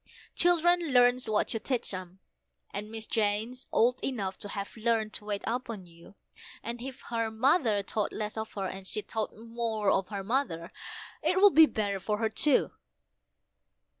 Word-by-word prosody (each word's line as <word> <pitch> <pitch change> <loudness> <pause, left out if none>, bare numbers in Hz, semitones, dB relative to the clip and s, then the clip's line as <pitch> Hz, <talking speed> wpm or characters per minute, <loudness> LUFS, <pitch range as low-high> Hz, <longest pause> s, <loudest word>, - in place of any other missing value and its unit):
Children 350 0 +4
learns 245 -1 +4
what 215 - +1
you 225 - -1
teach 245 -3 -1
'em, 185 0 -7 0.5
and 205 +1 -5
Miss 225 0 -3
Jane's 220 +4 -1
old 245 +2 +2
enough 200 -8 -2
to 205 - -7
have 200 0 -5
learned 225 -1 0
to 210 - -5
wait 205 -1 -3
upon 230 -5 -3
you: 170 +3 -17 0.5
And 235 +1 -5
if 260 0 -7
her 230 -1 0
mother 225 - +2
thought 210 +1 -1
less 210 0 -4
of 220 0 -5
her 195 -2 -3
and 190 0 -6
she 215 - 0
thought 220 -2 -4
more 225 -2 -1
of 190 -1 +1
her 200 -2 -5
mother, 195 -8 -1 0.5
it 370 - +2
would 405 0 +7
be 320 0 +8
better 200 -5 -1
for 210 +3 -1
her 220 0 0
too." 270 +5 +3
220 Hz, 170 wpm, -29 LUFS, 205-245 Hz, 0.5 s, be